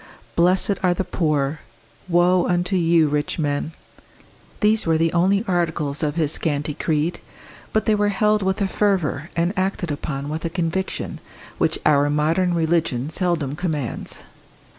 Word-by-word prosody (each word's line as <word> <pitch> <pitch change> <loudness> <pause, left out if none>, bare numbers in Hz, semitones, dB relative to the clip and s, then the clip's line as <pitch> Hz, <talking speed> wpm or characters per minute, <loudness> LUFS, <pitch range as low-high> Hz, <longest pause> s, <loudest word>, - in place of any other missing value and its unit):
"Blessed 185 +3 +3
are 180 -1 +2
the 190 - -1
poor" 150 -4 -1 0.5
"Woe 175 +1 +3
unto 180 +2 0
you, 165 -3 +3
rich 145 0 -1
men" 145 0 -1 0.9
these 215 -2 +3
were 160 -1 +3
the 165 0 +1
only 190 +4 +2
articles 160 -5 -1
of 150 -1 -1
his 155 -3 +1
scanty 150 -2 -1
creed, 155 +3 -1 0.5
but 220 - 0
they 215 - +3
were 205 0 +2
held 210 +1 +2
with 190 +1 -1
a 200 - +2
fervour, 180 -8 0
and 170 +3 +1
acted 185 -3 -1
upon 140 -1 -4
with 155 +2 -4
a 165 - -1
conviction, 175 +2 -3 0.4
which - - +2
our 145 -1 +4
modern 165 +5 +1
religion 160 -5 0
seldom 165 -7 -1
commands. 155 -7 -4
170 Hz, 150 wpm, -22 LUFS, 150-185 Hz, 0.9 s, our